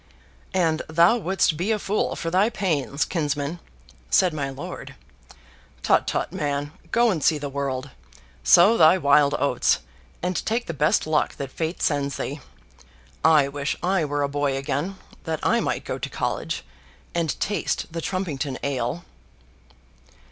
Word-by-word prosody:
"And 165 -3 +2
thou 170 +8 +5
wouldst 190 -6 +1
be 185 +7 0
a 220 - +2
fool 205 0 -1
for 165 - -4
thy 190 +5 +3
pains, 155 - -1
kinsman," 150 -1 -2 0.5
said 185 -4 +4
my 140 -3 -2
lord. 135 +1 -8 0.9
"Tut, - - +3
tut, - - -2
man. 145 0 -2 0.2
Go 235 -1 +3
and 160 -7 -2
see 155 - +4
the 145 -1 -5
world. 135 -1 -3 0.5
Sow 200 +7 +6
thy 160 +3 +7
wild 145 -2 +4
oats; 135 -2 +2 0.5
and 180 0 -1
take 235 +2 -1
the 170 - -4
best 150 +1 +2
luck 155 -1 +1
that 135 -2 -6
Fate 160 +4 -3
sends 140 -2 0
thee. 145 +3 -4 0.8
I 155 -3 +5
wish 140 +1 -2
I 185 -1 +2
were 145 -1 -1
a - - +1
boy 140 -1 -1
again, 145 +7 -2 0.3
that 160 -2 -2
I 235 - +3
might - - -2
go - - -4
to - - -4
college, - - -3 0.5
and 165 -3 -1
taste 205 - -1
the 165 - -3
Trumpington 160 -8 -3
ale." 140 +4 -2
155 Hz, 155 wpm, -24 LUFS, 140-180 Hz, 0.9 s, thy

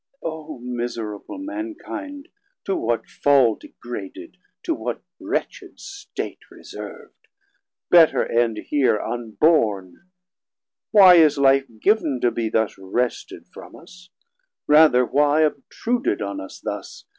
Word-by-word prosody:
O 155 -2 -6
miserable 120 - -5
Mankind, 300 -1 -7 0.4
to 195 - -1
what 115 0 -2
fall 135 -5 +3
Degraded, 110 - -10 0.3
to 335 - -1
what - - -5 0.2
wretched - - -5
state 400 +1 -7
reserv'd? - - -12 0.6
Better 170 -3 +6
end 115 -2 0
heer 130 -1 +1
unborn. 115 - 0 0.8
Why 190 -4 +8
is 155 -3 +5
life 135 0 +3
giv'n 175 - +1
To 120 - +2
be 115 -2 -2
thus 110 -3 -1
wrested 120 +6 -3
from - - -12
us? 180 +2 -16 0.6
rather 150 -5 +5
why 145 +4 +2
500 155 -2 +2
Obtruded 235 - -2
on 100 -1 -5
us 95 - -10
thus? - - -7
140 Hz, 115 wpm, -22 LUFS, 115-180 Hz, 0.8 s, Why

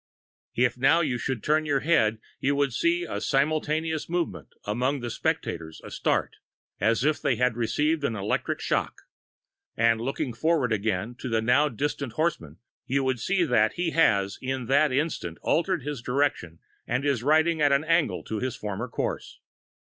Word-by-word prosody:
If 125 +1 +1
now 140 +6 +4
you 130 -6 -1
should 130 -2 -3
turn 155 +1 +2
your 140 -2 +1
head 115 -10 +3 0.2
you 140 +2 +1
would 140 -3 +1
see 170 +6 +1
a - - -4
simultaneous 155 +3 0
movement 175 -1 -2 0.2
among 125 +7 0
the 120 -1 -4
spectators 80 -6 -3
a - - -10
start, - - -1 0.4
as 115 +5 +2
if 150 +1 +1
they 140 -4 +1
had 125 0 +1
received 150 +7 0
an 115 -5 0
electric 100 0 -2
shock - - -2 0.7
and 115 0 +3
looking 130 0 -2
forward 135 -1 +1
again 105 +1 -1
to 130 - -5
the 115 -1 +1
now 125 +7 +3
distant 140 0 -3
horseman 115 - -2 0.3
you 135 +1 +1
would 130 -2 0
see 185 +9 +1
that 115 -8 +2
he 175 -1 -1
has 100 -12 +2
in 130 -1 -3
that 140 +3 +3
instant 130 - -2
altered 175 -2 +1
his 145 -3 -4
direction 125 - -1 0.3
and 125 +4 -1
is 140 -5 +1
riding 160 +4 +3
at 145 -1 +4
an 140 +2 +3
angle 165 0 +1
to 110 - -4
his 130 0 -2
former 105 -2 -4
course. - - -4
135 Hz, 170 wpm, -26 LUFS, 115-155 Hz, 0.7 s, now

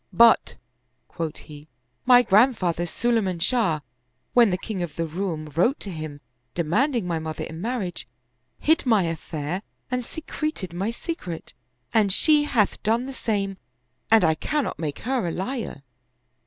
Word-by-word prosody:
" - - -48 0.2
But," 230 - +2 0.5
quoth 165 -2 -4
he, 150 0 -12 0.2
" 125 0 -47
my 245 -1 +8
grandfather 195 -6 +3
Sulay 235 +5 +1
man 185 -2 -2
Shah, 170 -5 +1 0.5
when 240 -3 +6
the 180 - 0
king 195 -1 -5
of 165 -4 -4
the 165 - -1
Roum 160 -2 -4
wrote 235 - +3
to 200 - -5
him 155 -3 -6 0.3
de 170 - +1
manding 240 - +1
my 170 -2 -1
mother 160 -1 -5
in 160 +1 -7
marriage, 215 -5 -3 0.5
hid 320 +2 +2
my 220 -5 +4
affair 165 +1 -3 0.3
and 250 0 0
secreted 305 - -5
my 190 +5 -1
secret; 230 - -6 0.4
and 210 -3 +4
she 300 - +5
hath 220 -8 +1
done 230 +4 +1
the 270 - -6
same, 200 -6 -1 0.5
and 220 -4 +6
I 160 - +4
cannot 290 - -2
make 150 -3 -3
her 250 -6 0
a - - -1
liar." 195 - -4
195 Hz, 165 wpm, -24 LUFS, 165-240 Hz, 0.5 s, my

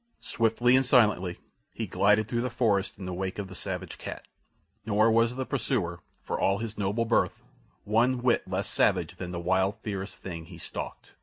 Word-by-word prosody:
Swiftly 115 +2 +3
and 130 - +5
silently 105 -9 +3 0.4
he - - -2
glided 105 +1 +3
through 120 0 -1
the 125 - -1
forest 110 -5 +1
in 95 - -7
the 90 - -4
wake 95 +1 -3
of 100 -2 -4
the - - -9
savage 95 0 -5
cat, - - -7 0.6
nor 110 +1 +3
was 115 +2 +3
the 130 0 -2
pursuer, 90 - -1 0.2
for - - -3
all 95 0 +2
his 115 -1 -5
noble 105 +3 0
birth, 115 - +1 0.4
one 120 +4 +2
whit 125 -2 +2
less - - -2
savage - - +1
than 90 - -5
the 90 -1 -4
wild, 95 +3 +1
fierce 100 -2 -4
thing 85 -3 -7
he - - -11
stalked. - - -7
105 Hz, 185 wpm, -28 LUFS, 95-115 Hz, 0.6 s, and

